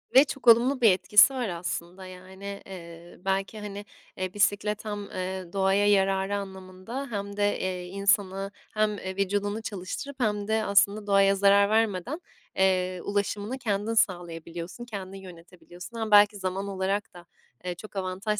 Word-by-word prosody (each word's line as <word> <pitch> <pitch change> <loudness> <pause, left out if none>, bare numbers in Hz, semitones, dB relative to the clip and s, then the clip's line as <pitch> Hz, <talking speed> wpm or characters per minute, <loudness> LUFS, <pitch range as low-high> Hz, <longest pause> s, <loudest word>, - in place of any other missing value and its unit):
Ve 265 - +10
çok 275 -3 -7
olumlu 245 +4 +6
bir 225 -4 +7
etkisi 195 +7 +6
var 250 -5 -2
aslında, 175 +1 -5
yani. 190 +2 -9
Iıı, 170 -1 -11
belki, 195 +2 -1
hani, 205 0 -7 0.3
eee, 185 0 -3
bisiklet 205 +1 0
hem, 205 -1 -4
aaa, 185 -1 -5
doğaya 195 +1 +2
yararı 195 0 +2
anlamında 190 +6 -6
hem 200 -1 -4
de, 205 0 +1
eee, 180 -1 -3
insanı 195 +1 0 0.2
hem, 215 -1 +1
eee, 190 -1 -6
vücudunu 205 +2 -1
çalıştırıp 220 +7 -6
hem 210 -4 0
de 220 0 +1
aslında 205 +1 +3
doğaya 195 0 +4
zarar 200 +1 +5
vermeden, 220 - 0 0.3
eee, 185 -1 +1
ulaşımını 205 +4 -2
kendin 215 -3 -1
sağlayabiliyorsun, 175 0 -2
kendin 195 -4 -7
yönetebiliyorsun. 180 +3 -11
Hem 220 -1 -3
belki 205 0 +7
zaman 190 +1 -3
olarak 195 +1 -2
da, 175 -1 -13 0.4
eee, 180 -1 -3
çok 210 +3 -12
avantaj 195 +3 -2
200 Hz, 150 wpm, -27 LUFS, 185-210 Hz, 0.4 s, Ve